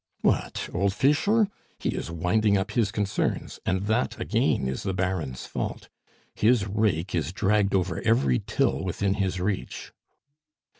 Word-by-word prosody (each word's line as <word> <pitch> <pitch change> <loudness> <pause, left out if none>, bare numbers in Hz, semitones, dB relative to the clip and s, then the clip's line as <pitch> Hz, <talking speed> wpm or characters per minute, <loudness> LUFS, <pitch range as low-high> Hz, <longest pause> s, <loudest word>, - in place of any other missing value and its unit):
"What! - - 0
Old 100 +2 +1
Fischer? 200 +11 +3 0.3
He - - -2
is - - -3
winding 100 +5 +2
up 95 0 -2
his 110 -5 +1
concerns, 105 -2 -2
and 95 +1 +1
that 110 +2 0
again 65 - +1
is 65 - -3
the 95 -2 -2
Baron's 90 -9 -2
fault; - - -5 0.4
his 115 -1 +3
rake 100 -4 0
is 80 -1 -1
dragged 100 0 +2
over 90 -3 0
every 70 - +3
till 70 - 0
within 95 +2 0
his 95 -2 -1
reach." 95 +1 -3
95 Hz, 145 wpm, -26 LUFS, 90-105 Hz, 0.4 s, Fischer